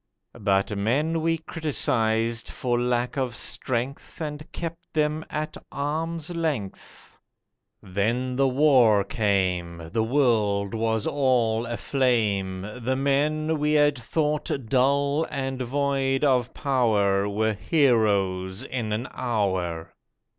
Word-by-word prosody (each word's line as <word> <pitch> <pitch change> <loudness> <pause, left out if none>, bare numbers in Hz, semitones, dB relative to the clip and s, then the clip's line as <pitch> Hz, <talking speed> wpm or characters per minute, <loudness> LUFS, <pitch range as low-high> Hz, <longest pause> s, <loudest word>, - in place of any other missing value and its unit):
But 100 0 +1
men 145 +11 0
we 165 +1 +1
criticised 115 -8 0
for 120 -1 -1
lack 125 +1 0
of 125 -3 -2
strength, 130 +5 -3
And 150 -1 -6
kept 170 0 -7
them 155 0 0
at 155 0 -4 0.2
arm's 160 +3 -3
length. 145 - -4 0.7
Then 115 +7 -1
the 135 +1 +3
war 130 -7 +4
came— 90 -5 -1
The 110 - +2
world 110 -5 +1
was 110 -1 0
all 120 -5 +1
aflame! 110 -6 0 0.2
The 130 +3 0
men 150 +3 +1
we 150 +1 +1
had 145 -1 +4
thought 150 +4 -1 0.2
dull 140 +5 +2
and 135 -2 -3
void 135 +1 0
of 125 -4 +2
power 105 -7 +2
Were 110 +2 0
heroes 105 - +1
in 120 -5 -3
an 115 +5 -2
hour. 95 -9 -2
125 Hz, 110 wpm, -25 LUFS, 105-145 Hz, 0.7 s, war